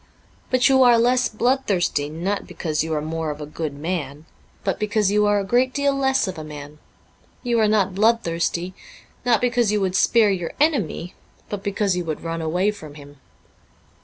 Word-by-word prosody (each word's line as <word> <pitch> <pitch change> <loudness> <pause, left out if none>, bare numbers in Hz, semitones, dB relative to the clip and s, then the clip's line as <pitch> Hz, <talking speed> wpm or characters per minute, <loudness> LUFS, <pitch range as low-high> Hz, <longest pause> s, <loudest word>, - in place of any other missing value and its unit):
But 255 -1 +3
you 265 -1 +4
are 245 -2 +6
less 250 +2 +2
bloodthirsty, 210 - 0
not 180 +6 -3
because 155 -3 -2
you 160 - -5
are 150 - -2
more 160 0 -3
of 150 0 -5
a 150 - -5
good 150 -1 -5
man, 150 -2 -4 0.4
but 195 - -1
because 210 -1 +1
you 210 0 +3
are 205 0 +3
a - - -2
great 250 +5 +1
deal 280 -1 +2
less 265 -4 +1
of 185 -3 -5
a - - -6
man. 150 0 -10 0.6
You 240 -2 +1
are 215 - +4
not 200 -3 +2
bloodthirsty, 185 -4 0 0.5
not 240 -2 +3
because 240 -3 +2
you 210 - +1
would 190 -2 -1
spare 220 -1 +4
your 175 -4 -3
enemy, 220 - 0 0.4
but 205 -2 -4
because 200 -1 0
you 180 - -2
would 160 -2 -5
run 165 0 -3
away 180 +6 +1
from 155 -8 -11
him.' 145 -1 -13
195 Hz, 190 wpm, -22 LUFS, 160-230 Hz, 0.6 s, are